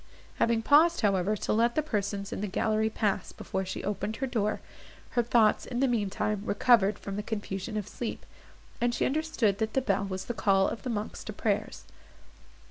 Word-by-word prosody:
Having 230 -1 +2
paused, 320 +6 +5
however, 200 -1 +2
to - - -1
let 235 +2 +2
the 310 - +2
persons 200 -6 -2
in - - -4
the 210 - -1
gallery 220 +2 +1
pass 210 -2 -1
before 190 - -4
she 185 - -5
opened 210 +2 -2
her 270 - -2
door, 215 -5 -1 0.5
her 240 - +2
thoughts, 230 -2 +3
in 245 - -4
the 270 - +3
mean 220 -5 0
time, 210 +1 -1
recovered 210 -1 +3
from 200 0 -6
the - - -1
confusion 205 0 -4
of 210 -2 -3
sleep, 235 +1 -5 0.6
and 240 0 +1
she - - +1
understood 270 -9 0
that 220 -1 -1
the - - +3
bell 200 -5 0
was 190 -1 -4
the 240 - -3
call 195 -3 +3
of - - -4
the 255 - -4
monks 215 -2 -4
to - - -5
prayers. - - -2
215 Hz, 200 wpm, -29 LUFS, 200-240 Hz, 0.6 s, paused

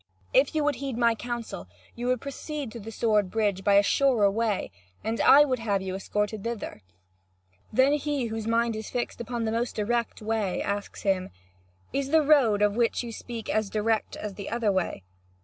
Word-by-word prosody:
If - - +4
you 305 - +2
would 290 -2 +1
heed 270 -4 -4
my 235 -1 +4
counsel, 235 - -5 0.3
you 240 +1 -4
would 255 -1 +1
proceed 280 -1 -5
to 235 - -8
the 225 +1 -8
sword 210 -4 +1
bridge 205 -2 0
by 200 0 +4
a 200 - +6
surer 230 -4 +3
way, 220 -1 -1 0.3
and 225 +1 -1
I 290 +2 +8
would 255 -3 -1
have 200 -4 0
you 190 -1 -4
escorted 210 +2 -2
thither." 230 - -5 0.9
Then 260 +5 +4
he, 290 -3 -1
whose 225 -1 -4
mind 230 0 +1
is 220 0 -6
fixed 240 -1 -3
upon 235 0 -3
the 220 - 0
most 235 +2 -1
direct 235 +2 -1
way, 215 -3 -1
asks 200 0 -4
him: 190 -2 +1 0.6
"Is 275 -1 -1
the 315 +1 +4
road 255 -9 +4
of 205 0 +2
which 235 +1 +1
you 235 - -6
speak 230 0 -7
as 215 -2 0
direct 220 +1 0
as 210 -1 -5
the 200 0 -7
other 230 -3 +1
way?" 185 - -1
225 Hz, 195 wpm, -27 LUFS, 210-245 Hz, 0.9 s, I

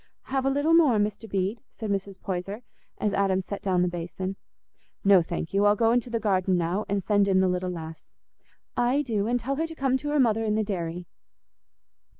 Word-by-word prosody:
"Have 270 0 +1
a - - +4
little 285 +4 +2
more, 305 -9 +5
Mr. 210 +1 -2
Bede?" 195 +4 -1
said 220 -3 -5
Mrs. 195 -1 -3
Poyser, 195 +5 -4 0.3
as 210 -2 -1
Adam 195 -2 +2
set 200 +1 -5
down 185 -2 +1
the - - +2
basin. 175 +2 -4 0.7
"No, 195 -2 +6
thank 165 0 -4
you; 200 +1 +3
I'll 205 - +5
go 225 +1 +3
into 245 0 +1
the 230 -1 -1
garden 190 -3 +1
now, 175 +5 -1
and 200 -1 0
send 205 0 +3
in 190 -1 +3
the 190 - +3
little 180 0 -1
lass." 160 -2 -7 0.7
"Aye, 250 +4 +2
do; 215 -5 -1
and 245 +1 +1
tell 270 +4 -3
her 325 +2 0
to 325 - -9
come 265 -3 +1
to 290 +3 -5
her 295 0 +1
mother 225 -3 +3
in 215 -1 0
the 215 - +1
dairy." 175 -4 -4
200 Hz, 210 wpm, -26 LUFS, 185-240 Hz, 0.7 s, No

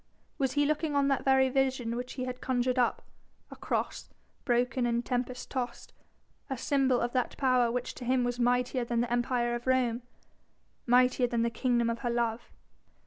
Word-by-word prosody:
Was 265 -2 0
he 290 0 +2
looking 305 0 0
on 280 0 +3
that 275 - 0
very 265 -1 +4
vision 260 -3 0
which 250 +1 -5
he 255 - -4
had 250 0 -6
conjured 255 0 0
up, 245 - +1 0.5
a - - -8
cross, - - -3 0.4
broken 245 0 +1
and 235 0 -1
tempest 250 0 -3
tossed, 245 -3 -4 0.6
a 265 - -3
symbol 265 -1 +2
of 240 - -2
that 255 -2 -1
power 255 -3 +3
which 250 +1 -3
to 250 - -9
him 255 0 +2
was 245 0 -2
mightier 250 +1 +1
than 235 0 0
the 240 0 -2
Empire 240 0 0
of 240 +1 -5
Rome, 250 -2 +2 0.9
mightier 250 +1 +4
than 235 -1 0
the 235 - 0
kingdom 240 -1 +1
of 230 0 -2
her 240 - -2
love? 235 -1 -1
250 Hz, 185 wpm, -30 LUFS, 240-260 Hz, 0.9 s, very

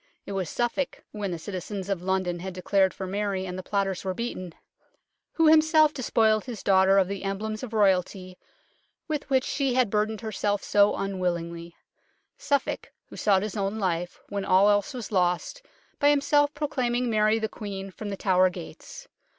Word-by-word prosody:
It - - -7
was 190 -4 -2
Suffolk, 240 +3 -2
when 205 -2 -4
the 175 - -3
citizens 190 +2 -6
of 195 -3 -2
London 185 -1 -1
had 185 +1 -6
declared 190 +1 +2
for 190 - -6
Mary, 195 0 -2
and 180 -1 -5
the 185 - -5
plotters 195 -1 -2
were 190 -1 -2
beaten, 185 -7 -5 0.8
who 325 - +2
himself 310 -1 +5
despoiled 220 -4 +2
his 235 -6 -7
daughter 190 0 +4
of 190 -2 +4
the 195 0 -5
emblems 210 +2 -3
of 255 - -6
Royalty 185 -3 +1 0.7
with 300 -3 -3
which 260 -2 +3
she 275 -3 -1
had 250 -5 +2
burdened 215 +1 0
herself 205 -2 -2
so 205 0 +3
unwillingly; 170 -3 -3 0.6
Suffolk 285 -1 -1 0.2
who - - -11
sought 195 -2 +2
his 215 0 -4
own 200 +1 -2
life, 180 -3 -2
when 200 -1 -3
all 195 +2 +5
else 205 +7 0
was 240 -3 -6
lost, 180 - 0 0.4
by 290 - +5
himself 290 0 +3
proclaiming 250 -5 -1
Mary 215 -1 +3
the 220 -1 -1
Queen 195 -2 -7
from 210 +2 -7
The 195 - -4
Tower 185 -2 +3
gates. - - -10
200 Hz, 175 wpm, -26 LUFS, 185-235 Hz, 0.8 s, himself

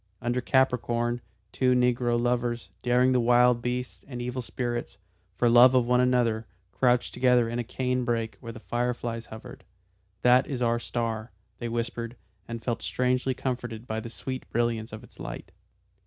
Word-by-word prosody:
Under 120 +1 -1
Capricorn, 120 -2 +1 0.3
two 125 -1 +2
negro 125 -1 +2
lovers, 120 -4 -1
daring 125 +1 +3
the 125 - +3
wild 120 0 +4
beasts 125 +1 -3
and 125 -3 -6
evil 125 +1 -3
spirits, 120 -3 -4 0.4
for 120 +7 +2
love 120 +2 +7
of 125 -2 +4
one 125 +1 +3
another, 120 -3 +2 0.2
crouched 125 -1 +2
together 125 -2 +3
in 120 +1 -3
a - - 0
cane 125 +1 -1
brake 115 -2 -1
where 115 -2 -7
the 110 - -10
fire 120 +2 -1
flies 115 -1 -5
hovered. 110 0 -10 0.6
"That 125 +1 +5
is 135 -4 -3
our 120 0 +2
star," 115 -1 -3 0.3
they 120 - -3
whispered, 115 0 -3 0.3
and 115 -1 -6
felt 120 -1 -2
strangely 125 +1 0
comforted 120 -3 -4
by 110 -3 -3
the 115 - -7
sweet 130 +2 -6
brilliance 115 -1 -1
of 110 - -8
its - - -18
light. - - -7
120 Hz, 170 wpm, -27 LUFS, 115-125 Hz, 0.6 s, love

